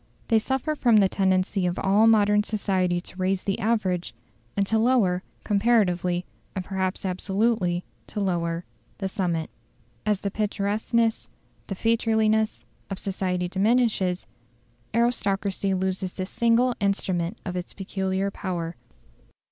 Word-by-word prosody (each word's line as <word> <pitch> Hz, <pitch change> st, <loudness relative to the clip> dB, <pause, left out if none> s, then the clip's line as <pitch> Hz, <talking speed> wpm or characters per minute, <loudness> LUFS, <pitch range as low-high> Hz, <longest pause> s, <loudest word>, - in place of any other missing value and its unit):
They 225 Hz, -, +5 dB
suffer 265 Hz, +6 st, -1 dB
from 245 Hz, -6 st, +3 dB
the 200 Hz, -2 st, +6 dB
tendency 190 Hz, 0 st, +1 dB
of 175 Hz, -, -2 dB
all 205 Hz, +3 st, +4 dB
modern 210 Hz, -2 st, +5 dB
society 190 Hz, -4 st, 0 dB
to 185 Hz, -, -13 dB
raise 185 Hz, 0 st, 0 dB
the 195 Hz, -, -1 dB
average, 195 Hz, -6 st, 0 dB, 0.4 s
and 200 Hz, -, +3 dB
to 220 Hz, +2 st, +1 dB
lower 220 Hz, -7 st, +3 dB, 0.2 s
comparatively, 185 Hz, -5 st, +2 dB, 0.3 s
and 185 Hz, -2 st, -3 dB
perhaps 190 Hz, 0 st, -2 dB
absolutely, 190 Hz, -1 st, 0 dB, 0.2 s
to -, -, -5 dB
lower 170 Hz, -3 st, -1 dB, 0.3 s
the 195 Hz, -, -2 dB
summit. 175 Hz, -5 st, -2 dB, 0.5 s
As 210 Hz, -2 st, 0 dB
the 200 Hz, -, -2 dB
picturesqueness, 215 Hz, +2 st, 0 dB, 0.4 s
the 195 Hz, -, -3 dB
featureliness, 220 Hz, -, +1 dB, 0.3 s
of 195 Hz, -, -4 dB
society 185 Hz, -2 st, -1 dB
diminishes, 195 Hz, -2 st, +1 dB, 0.7 s
aristocracy 200 Hz, -4 st, 0 dB
loses 190 Hz, 0 st, -2 dB
the 185 Hz, -, -3 dB
single 235 Hz, +5 st, +2 dB
instrument 195 Hz, -1 st, 0 dB
of 180 Hz, -2 st, -4 dB
its 180 Hz, 0 st, -4 dB
peculiar 190 Hz, 0 st, -2 dB
power. 175 Hz, -4 st, -4 dB
195 Hz, 125 wpm, -25 LUFS, 185-220 Hz, 0.7 s, the